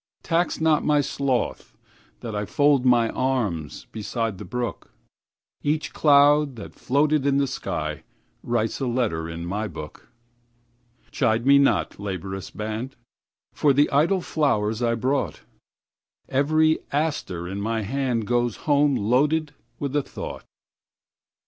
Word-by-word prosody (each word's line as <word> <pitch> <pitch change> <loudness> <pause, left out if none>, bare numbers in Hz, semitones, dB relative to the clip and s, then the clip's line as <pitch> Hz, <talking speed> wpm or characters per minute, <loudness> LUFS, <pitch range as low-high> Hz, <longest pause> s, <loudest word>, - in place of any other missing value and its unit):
Tax 170 +1 0
not 160 -2 +3
my 150 -1 +3
sloth 135 -3 -2 0.4
that 115 -2 -5
IFold 130 +6 +2
my 120 -2 +4
arms 105 - -2
beside 110 -2 -3
the - - -7
brook; 120 -4 -4 0.7
Each 150 +1 -1
cloud 145 -1 +4
that 105 -4 -9
floated 145 +2 +1
in 140 0 +2
the 140 - +3
skyWrites 110 - -4
a 135 - 0
letter 110 -10 -1
in 85 +1 -6
my 105 +5 -2
book. 80 -3 -10 1.0
Chide 110 +1 +1
me 140 +1 +7
not, 140 - +1
laborious 95 -1 -5
band, 110 +5 -5 0.6
For 145 -2 +3
the 145 +2 +3
idle 165 +7 +3
flowers 110 -10 0
I 115 -1 +2
brought; 130 +5 -1 0.9
Every 155 +4 +2
aster 140 - -2
in 100 +2 -4
my 110 +1 -1
handGoes 120 -1 0
home 145 -1 +3
loaded 145 +7 +1 0.2
with 140 -1 -4
a 145 - +3
thought. - - -8
125 Hz, 125 wpm, -24 LUFS, 105-145 Hz, 1.0 s, me